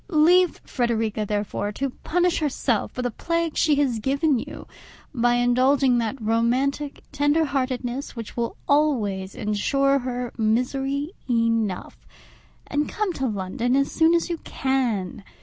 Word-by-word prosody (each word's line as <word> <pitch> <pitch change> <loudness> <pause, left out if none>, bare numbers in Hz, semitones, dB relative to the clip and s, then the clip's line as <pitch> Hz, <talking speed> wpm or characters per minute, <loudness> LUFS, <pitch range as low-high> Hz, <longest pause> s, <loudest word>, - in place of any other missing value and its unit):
Leave 355 +1 +4
Frederica, 225 -4 -1
therefore, 205 0 -2
to 270 +5 -3
punish 355 +6 0
herself 270 -6 0
for 250 - -4
the 245 - -1
plague 335 +5 -2
she 305 -2 +3
has 270 -5 +1
given 275 +3 +1
you, - - -8 0.5
by 240 -2 +2
indulging 255 +1 +3
that 235 +4 -2
romantic 245 +6 0
tender 290 +2 +2
heartedness 255 -2 -3
which 230 -2 -7
will 235 -1 -2
always 220 -11 +1
ensure 275 +7 +1
her 245 -1 -4
misery 270 +7 0 0.2
enough, 230 -5 0 0.7
and 290 +1 -1
come 420 -4 -1
to 270 -4 -2
London 215 +4 -1
as 275 0 +1
soon 330 +1 +4
as 335 - +1
you 340 -2 -3
can. 235 -9 -2
255 Hz, 135 wpm, -24 LUFS, 230-290 Hz, 0.7 s, Leave